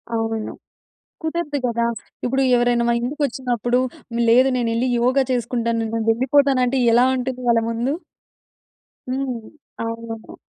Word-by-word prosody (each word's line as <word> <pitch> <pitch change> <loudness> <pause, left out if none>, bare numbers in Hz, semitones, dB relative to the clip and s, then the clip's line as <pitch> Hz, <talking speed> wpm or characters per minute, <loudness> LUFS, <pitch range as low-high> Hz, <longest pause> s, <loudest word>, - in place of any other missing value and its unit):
అవును. 225 -1 -2 0.7
కుదరదు 320 -2 -2
గదా! 235 0 0 0.4
ఇప్పుడు 265 +2 +1
ఎవరైనా 240 0 +2
మా 235 - +3
ఇంటికొచ్చినప్పుడు, 245 -2 -1 0.5
లేదు 255 +3 +6
నేనెళ్ళి 235 +1 0
యోగా 255 +3 +3
చేసుకుంటాను, 235 -1 -1 0.2
నేను 225 -1 -1
వెళ్ళిపోతానంటే 260 0 +2
ఎలా 240 +2 +5
ఉంటుంది 255 0 -3
వాళ్ళ 230 -1 +4
ముందు. 240 +4 -1 1.2
హ్మ్. 255 -2 -2 0.5
అవును. 230 -1 -6
245 Hz, 110 wpm, -21 LUFS, 230-260 Hz, 1.2 s, లేదు